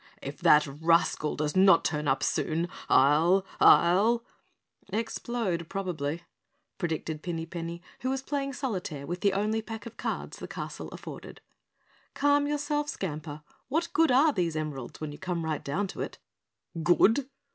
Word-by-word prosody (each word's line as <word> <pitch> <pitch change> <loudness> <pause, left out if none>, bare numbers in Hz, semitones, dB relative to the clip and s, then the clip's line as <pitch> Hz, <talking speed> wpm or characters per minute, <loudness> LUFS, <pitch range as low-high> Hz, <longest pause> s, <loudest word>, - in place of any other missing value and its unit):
"If - - -7
that 150 0 +6
rascal 155 +1 +1
does 150 +2 -2
not 190 -2 +6
turn 150 -2 -1
up 135 0 +1
soon, 165 +2 0 0.2
I'll 160 +8 +5
I'll 210 +7 +5 0.3
" - - -39
"Explode, 225 -7 -3
probably," 170 -5 -3 0.6
predicted 160 -2 -3
Pinny 165 -1 -3
Penny, 170 0 -6 0.2
who 255 - -2
was 265 0 -2
playing 275 -1 -2
solitaire 185 - -4
with 175 +4 -4
the 200 -1 +3
only 215 +3 0
pack 220 -1 -8
of 230 - -10
cards - - -4
the - - -6
castle - - -6
afforded. - - -9 0.8
"Calm 285 0 +3
yourself, 295 0 -1
Skamper, 150 - -5 0.2
what 325 +6 -1
good 325 +1 +4
are 280 +4 +5
these 170 -4 -1
emeralds 150 -5 -5
when 155 -1 -4
you 145 - -10
come 175 -3 -3
right 155 -2 -2
down 170 +9 -1
to - - -6
it?" - - -5 0.6
"Good? 225 - +4
175 Hz, 155 wpm, -28 LUFS, 155-230 Hz, 0.8 s, that